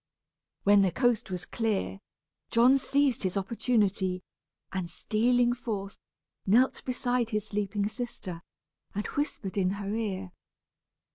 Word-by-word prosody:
When 200 0 +6
the 190 -2 +3
coast 245 +1 +1
was 180 -2 -4
clear, 215 -3 -1 0.5
John 250 +4 +5
seized 275 -2 +2
his 190 0 -1
opportunity, 195 -3 +1 0.5
and 185 -3 -3
stealing 240 +6 +2
forth, 210 -5 -5 0.4
knelt 240 +7 +3
beside 245 -2 0
his 215 -2 -1
sleeping 205 0 -1
sister, 215 -7 -6 0.5
and 205 - -2
whispered 215 -9 -2
in 185 -1 +2
her 200 0 -3
ear. 195 -4 -2
210 Hz, 120 wpm, -29 LUFS, 195-245 Hz, 0.5 s, When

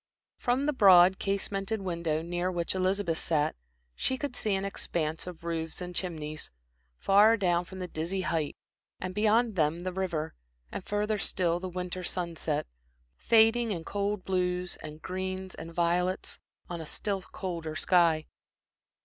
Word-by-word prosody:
From 250 +3 +1
the 300 - +2
broad 190 -5 +7
casemented 195 +2 -1
window 170 -3 -1
near 175 +2 -1
which 170 -1 -1
Elizabeth 185 -2 0
sat, 150 -2 +1 0.4
she 260 - -1
could 280 -2 -4
see 215 -4 +1
an 195 +1 -1
expanse 165 -4 -2
of 175 -2 -8
roofs 165 -1 -3
and 180 -1 -5
chimneys, 155 -4 -4 0.5
far 210 +3 +6
down 175 -3 +2
from 190 - -10
the 180 -1 -4
dizzy 175 +4 -2
height, 165 -5 -1 0.4
and 185 0 -4
beyond 220 +2 +3
them 160 0 +1
the 185 0 -3
river, 170 -4 -2 0.4
and - - -5
further 210 +1 0
still 175 -4 +1
the 185 +1 -4
winter 180 0 -4
sunset, 170 -4 -2 0.5
fading 225 - +4
in 170 -5 -3
cold 200 +1 -2
blues 180 -1 0
and 155 0 -9
greens 185 0 -4
and 165 +1 -8
violets, 175 +2 0 0.3
on 170 -1 -5
a 160 - -7
still 200 +2 -2
colder 170 -5 -5
sky. 165 -3 +3
180 Hz, 150 wpm, -30 LUFS, 170-195 Hz, 0.5 s, broad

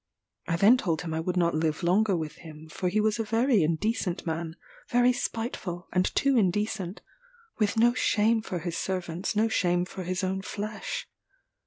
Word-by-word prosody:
I 170 - +1
then 205 +8 +6
told 170 -9 -1
him 165 -2 -4
I 160 - -1
would 180 +2 -2
not 170 -1 +2
live 155 +2 -1
longer 190 +2 +3
with 155 -2 -5
him, 155 -2 -11
for 180 +3 -2
he 210 +4 +1
was 215 +1 +1
a - - +1
very 225 0 +2
indecent 175 +3 -1
man 160 0 -3 0.3
very 245 +1 +4
spiteful, 225 -7 -4
and 185 0 +3
too 275 -1 +3
indecent; 200 -2 0 0.6
with 210 0 +1
no 240 +2 +5
shame 225 -2 +2
for 185 -4 -4
his 170 0 -4
servants, 180 +1 -3
no 220 +2 +3
shame 175 -4 +1
for 185 0 -7
his 185 +2 -2
own 190 +1 -1
flesh. 210 +2 -5
185 Hz, 180 wpm, -27 LUFS, 170-220 Hz, 0.6 s, then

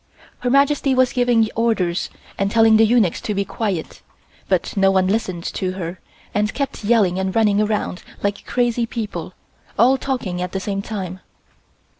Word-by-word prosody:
Her 245 - -1
Majesty 275 0 +3
was 255 -1 +3
giving 245 -3 +3
orders 205 -7 0 0.3
and 195 0 0
telling 225 0 +5
the 225 0 +5
eunuchs 220 -7 +2
to 210 - -3
be 200 0 0
quiet, 195 -8 -3 0.5
but - - 0
no 195 -1 +4
one 190 -1 +3
listened 185 -4 -1
to 185 -1 -2
her 175 -1 -5 0.3
and 210 +1 0
kept 280 -5 -3
yelling 205 -5 +3
and 190 0 -2
running 210 -2 +3
around 210 -3 -1 0.2
like 200 0 -2
crazy 240 -1 0
people, 210 -7 -5 0.4
all 255 +5 +4
talking 220 -11 -3
at 180 -1 -4
the 190 - -1
same 195 +1 -3
time. 190 -3 -5
210 Hz, 165 wpm, -20 LUFS, 190-235 Hz, 0.5 s, telling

